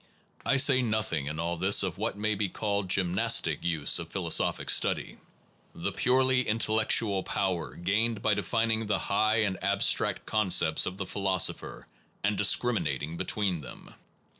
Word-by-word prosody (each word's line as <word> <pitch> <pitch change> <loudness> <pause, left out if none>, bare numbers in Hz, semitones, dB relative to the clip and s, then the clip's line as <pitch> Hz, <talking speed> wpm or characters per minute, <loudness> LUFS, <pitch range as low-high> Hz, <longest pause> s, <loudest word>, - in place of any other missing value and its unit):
I 140 - +1
say 130 -1 +4
nothing 110 - -2
in 75 +2 -4
all 85 +1 -2
this 95 +4 +3
of 95 -1 -4
what 105 - -3
may 105 +1 -1
be 100 -1 -2
called 100 0 -2
the 90 - +1
gymnastic 95 -1 0
use 80 -4 +2
of - - -7
philosophic - - 0
study, - - 0 0.6
the - - -3
purely 130 0 +2
intellectual 110 -3 +1
power 95 -3 -3
gained 105 +5 -1
by 110 - +2
defin 115 +3 -1
ing 110 0 -1
the 105 - 0
high 110 +2 +1
and 100 -3 -3
abstract 100 0 +1
concepts 90 -7 +2
of 95 - -5
the 100 - -4
phi 100 - -6
losopher, 95 -3 -1 0.4
and 105 +1 0
discriminating 85 - 0
between 95 -2 -2
them. 65 - -12
100 Hz, 160 wpm, -28 LUFS, 90-110 Hz, 0.6 s, say